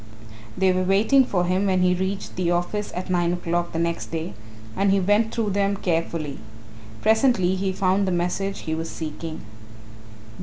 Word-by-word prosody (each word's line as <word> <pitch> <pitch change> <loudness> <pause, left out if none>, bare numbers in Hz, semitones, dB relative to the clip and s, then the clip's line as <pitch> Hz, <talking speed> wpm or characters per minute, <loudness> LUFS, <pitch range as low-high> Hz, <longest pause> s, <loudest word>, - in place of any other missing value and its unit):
They 190 -1 +3
were 185 - +1
waiting 205 +9 +4
for 180 -6 0
him 185 +3 +1
when 185 -1 +2
he 180 0 +4
reached 190 +2 -3
the 180 -1 0
office 175 +4 -1
at 185 +1 -4
nine 175 -1 +2
o'clock 175 0 -1
the - - -4
next 170 0 -1
day 160 -8 -4 0.4
and 200 0 +2
he 195 0 +4
went 205 +4 +2
through 220 -3 -1
them 200 0 +1
carefully. 165 -5 -2 0.6
Presently 220 -5 +3
he 190 0 -1
found 190 +1 +1
the - - +1
message 180 +3 -1
he 160 - -3
was 165 +1 -3
seeking. 160 0 -6
185 Hz, 175 wpm, -24 LUFS, 175-200 Hz, 0.6 s, waiting